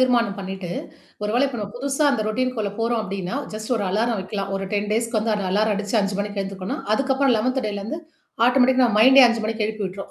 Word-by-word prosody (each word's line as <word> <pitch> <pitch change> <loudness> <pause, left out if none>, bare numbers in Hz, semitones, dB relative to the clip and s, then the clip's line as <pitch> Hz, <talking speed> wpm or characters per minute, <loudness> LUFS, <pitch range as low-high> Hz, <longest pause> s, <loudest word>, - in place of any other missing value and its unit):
தீர்மானம் 240 -5 +2
பண்ணீட்டு, 190 -2 -6 0.5
ஒரு 210 - -1
வேளை 260 +3 +3
இப்ப 250 -3 -6
நம்ம 205 0 -5
புதுசா 275 +3 -1
அந்த 230 -5 0
ரொட்டீனக்குள்ள 230 -2 -1
போறோம் 230 0 +1
அப்படின்னா, 195 +2 -4 0.2
ஜஸ்ட் 215 +3 -4
ஒரு 205 - -1
அலாரம் 225 +3 0
வக்கலாம். 195 +1 -4
ஒரு 195 0 -4
10 205 0 -1
டேஸ்க்கு 230 +1 0
வந்து 220 0 0
அந்த 200 -2 -3
அலாரம் 210 +2 +2
அடிச்சு 205 +2 -2
5:00 200 0 -2
மணிக்கு 205 0 -3
எழுந்துக்கோனும், 195 -1 -5
அதுக்கப்புறம் 265 +1 +2
11த் 255 +3 0
டேலருந்து 210 +10 -5 0.5
ஆட்டோமேட்டிக்கா 255 0 +4
நம்ம 215 -3 +1
மைண்டே 265 +3 +8
5:00 235 -1 -1
மணிக்கு 220 -1 -1
எழுப்பி 215 -1 -4
விட்டு்ரும். 190 +1 -8
220 Hz, 210 wpm, -22 LUFS, 200-250 Hz, 0.5 s, மைண்டே